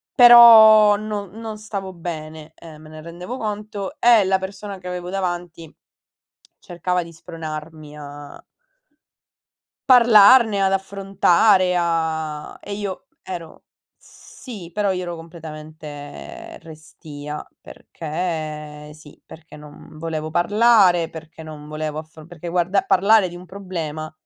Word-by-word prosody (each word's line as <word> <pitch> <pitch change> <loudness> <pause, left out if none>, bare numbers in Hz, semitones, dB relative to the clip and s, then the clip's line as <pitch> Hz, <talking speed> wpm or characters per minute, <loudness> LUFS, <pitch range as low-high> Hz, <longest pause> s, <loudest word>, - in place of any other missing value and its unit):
Però, 220 -3 +8
non 205 -2 -5
non 220 0 -8
stavo 200 -3 -6
bene, 160 -2 -8
uhm, 155 -2 -13
me - - -13
ne 155 0 -11
rendevo 175 +8 -8
conto 210 -3 -6
e 235 -3 +5
la 190 0 +1
persona 195 +1 -7
che 180 -1 -11
avevo 180 0 -6
davanti 175 -4 -5 0.9
cercava 180 +1 -3
di 170 - -13
spronarmi 155 -1 -9
a 145 0 -11 1.5
parlarne, 230 -3 +6
ad 190 - +1
affrontare, 195 -1 +2
a 160 -3 -3
e 205 - -9
io 200 -2 -6 0.2
ero 170 -3 -9 0.3
sì, 210 -10 -12
però 205 -1 0
io 185 -1 -2
ero 175 -1 -5
completamente 155 -3 -10
restia, 150 -2 -10
perché 150 - -6
sì, 155 -1 -17
perché 160 -1 -14
non 150 +1 -14
volevo 155 -1 -5
parlare, 185 -2 +3
perché 160 0 -12
non 150 -1 -11
volevo 155 0 -5
affro 155 0 -11
perché 175 0 -9
guarda 180 +3 0
parlare 200 +1 +3
di 175 - -10
un 180 +1 -12
problema 165 -5 -6
175 Hz, 120 wpm, -21 LUFS, 155-200 Hz, 1.5 s, Però